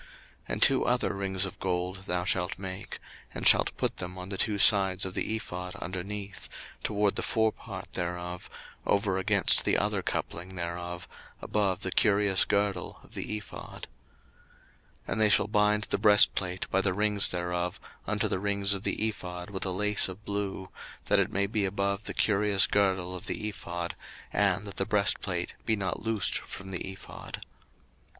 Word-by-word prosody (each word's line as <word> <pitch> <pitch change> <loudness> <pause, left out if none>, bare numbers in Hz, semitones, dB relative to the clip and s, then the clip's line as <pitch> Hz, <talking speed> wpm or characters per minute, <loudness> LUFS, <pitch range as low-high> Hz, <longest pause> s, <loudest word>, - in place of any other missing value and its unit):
02:028:027 - - -20 0.4
And - - +3
two - - +5
other - - +1
rings 95 -1 0
of 95 - -8
gold 95 +1 -2
thou 90 0 -1
shalt 90 -1 0
make, 95 0 -6 0.4
and - - +1
shalt - - +5
put - - -1
them 90 0 -5
on 90 +1 -7
the 100 - -4
two 105 -2 0
sides 95 -2 +5
of 95 - -5
the 110 - -1
ephod 90 -4 -6
underneath, 100 +2 -5 0.3
toward 105 -1 +1
the - - -1
forepart 110 -1 -2
thereof, 90 0 -4 0.3
over 100 -2 +1
against 95 - +4
the - - +2
other - - 0
coupling 95 +2 -4
thereof, 85 0 -5 0.3
above 100 -4 0
the 95 - -2
curious 100 -2 +4
girdle 100 -3 -1
of - - -17
the 105 - -3
ephod. 105 - -9 1.2
02:028:028 - - -10
And 110 - 0
they 105 - +5
shall 105 - +4
bind 105 0 +2
the 95 - -2
breastplate 100 -3 +4
by 95 - +3
the 95 -2 0
rings 105 -1 +5
thereof 90 0 -2 0.3
unto - - +1
the - - -1
rings 100 0 +1
of 95 - -3
the 110 - 0
ephod 90 -3 -6
with 95 -1 -2
a - - 0
lace 105 +3 +3
of 95 +3 -10
blue, 100 -2 -4 0.4
that - - +3
it - - +1
may 100 +1 +1
be 105 +1 -1
above 100 +1 -1
the - - -5
curious 105 -2 +3
girdle 95 -3 +1
of 90 +2 -8
the 105 - -2
ephod, 85 -4 -4 0.4
and 100 0 +2
that 100 -2 -8
the 95 - 0
breastplate 95 -3 0
be 110 - +2
not 95 -3 -3
loosed 110 -3 0
from 95 0 -9
the 95 +1 -4
ephod. 95 - -9
95 Hz, 175 wpm, -29 LUFS, 90-105 Hz, 1.2 s, two